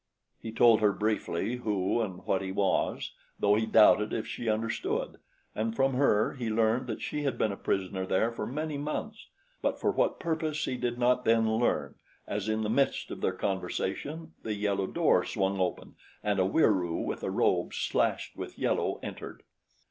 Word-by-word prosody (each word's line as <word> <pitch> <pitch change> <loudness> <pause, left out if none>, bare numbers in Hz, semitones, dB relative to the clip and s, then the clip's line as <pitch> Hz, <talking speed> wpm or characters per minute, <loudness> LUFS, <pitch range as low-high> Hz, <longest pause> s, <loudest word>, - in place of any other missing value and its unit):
He 110 - -6
told 115 0 +5
her 105 -2 +4
briefly 110 +1 -1
who 105 -1 0
and 95 -5 -5
what 95 - +1
he 95 -1 -4
was, 95 0 0 0.3
though 100 - +4
he 110 +1 +1
doubted 105 -1 +5
if 110 - -2
she 120 - -4
understood, 115 +1 -2 0.3
and 110 +1 -2
from 135 +1 +2
her 125 -5 +3
he 120 -4 -4
learned 115 +3 +1
that 110 - -4
she 150 - -3
had 135 -4 -1
been 110 - +1
a - - -4
prisoner 95 -1 -2
there 110 +6 +2
for 115 - -4
many 150 +2 -3
months; 215 +9 -4 0.3
but - - -1
for - - +1
what - - 0
purpose 160 -2 -1
he 130 - -2
did 120 -1 -2
not 125 +1 +2
then 115 0 +3
learn, 120 +2 0 0.3
as 105 +1 -3
in 110 0 0
the - - -1
midst 135 +5 +1
of - - -6
their - - +1
conversation 100 - -3
the 110 -1 -3
yellow 100 -2 0
door - - +3
swung 95 0 -1
open 90 -1 -2 0.3
and 105 -2 +1
a 95 - +4
Wieroo 95 - +2
with - - -3
a - - -2
robe - - +1
slashed - - -1
with - - -7
yellow - - 0
entered. - - -7
110 Hz, 185 wpm, -29 LUFS, 100-125 Hz, 0.3 s, told